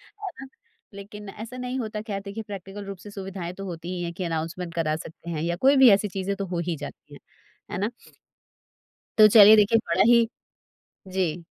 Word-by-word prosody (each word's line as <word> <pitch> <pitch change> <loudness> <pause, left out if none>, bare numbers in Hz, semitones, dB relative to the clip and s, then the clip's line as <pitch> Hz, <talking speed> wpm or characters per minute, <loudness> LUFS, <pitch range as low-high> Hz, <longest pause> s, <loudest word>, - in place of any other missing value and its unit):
है 410 -2 -6
ना? 270 - -8 0.5
लेकिन 200 +1 -10
ऐसा 225 +5 -8
नहीं 250 +1 -3
होता 215 -2 -4
ख़ैर 200 -3 -5
देखिए 205 +3 -6
प्रैक्टिकल 200 0 -8
रूप 195 -1 -7
से 205 +3 -12
सुविधाएँ 190 -3 -6
तो 195 +1 -8
होती 170 -1 -6
ही 175 - -3
है 170 - -3
कि 180 +2 -6
अनाउंसमेंट 165 +1 -4
करा 155 -2 0
सकते 160 +1 -10
हैं 155 -2 -3
या 170 +1 -1
कोई 270 +10 +4
भी 265 -3 +8
ऐसी 205 +1 +3
चीज़ें 195 +1 -3
तो 195 0 -4
हो 175 -2 -3
ही 170 - 0
जाती 145 0 -10
हैं। - - -11 0.5
है - - -3
ना? 205 - 0 1.3
तो 215 - +10
चलिए 215 0 +9
देखिए 215 +2 +4
बड़ा 170 +3 +3
ही 235 -1 +6 0.8
जी। 185 -3 -1
195 Hz, 205 wpm, -25 LUFS, 175-215 Hz, 1.3 s, तो